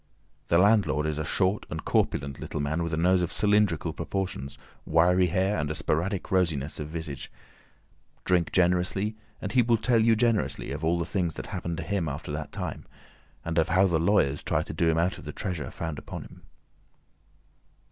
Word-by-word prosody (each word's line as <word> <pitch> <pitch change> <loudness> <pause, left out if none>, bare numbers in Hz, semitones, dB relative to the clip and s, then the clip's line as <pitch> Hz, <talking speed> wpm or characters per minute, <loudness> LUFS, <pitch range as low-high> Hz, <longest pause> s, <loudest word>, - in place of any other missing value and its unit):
The 85 - +3
landlord 90 -7 +3
is 75 -1 -2
a - - -1
short 95 +6 0
and - - -5
corpulent 70 -1 0
little - - -5
man 75 +3 -1
with 85 -1 -2
a 80 - -1
nose 90 +2 +3
of 85 - -1
cylindrical 105 -6 +2
proportions, 90 -9 -4 0.3
wiry 90 +3 +4
hair, 95 +4 +1
and 75 -1 -1
a 75 - -2
sporadic 90 +5 -1
rosiness 80 -7 0
of 75 - -4
visage. 80 -3 -6 0.9
Drink 90 -2 +2
generously, 90 +4 +1 0.3
and 105 - -3
he 130 - +5
will 115 0 +3
tell 115 +1 +2
you 115 0 +5
generously 110 - 0
of 75 +3 -5
all 85 +2 +2
the 85 - -1
things 90 -6 -1
that - - -6
happened 85 -2 -3
to - - -4
him 95 -6 -1
after 70 +1 -6
that 75 +1 -5
time, - - -5 0.6
and 85 0 0
of 80 - +1
how 95 +3 +4
the 85 -4 +2
lawyers 80 -6 +2
tried - - 0
to - - -6
do 85 - +2
him 80 - +2
out 85 +3 0
of - - -11
the 75 - -5
treasure 90 -3 -4
found 80 -3 -5
upon - - -7
him. - - -15
85 Hz, 195 wpm, -27 LUFS, 80-95 Hz, 0.9 s, he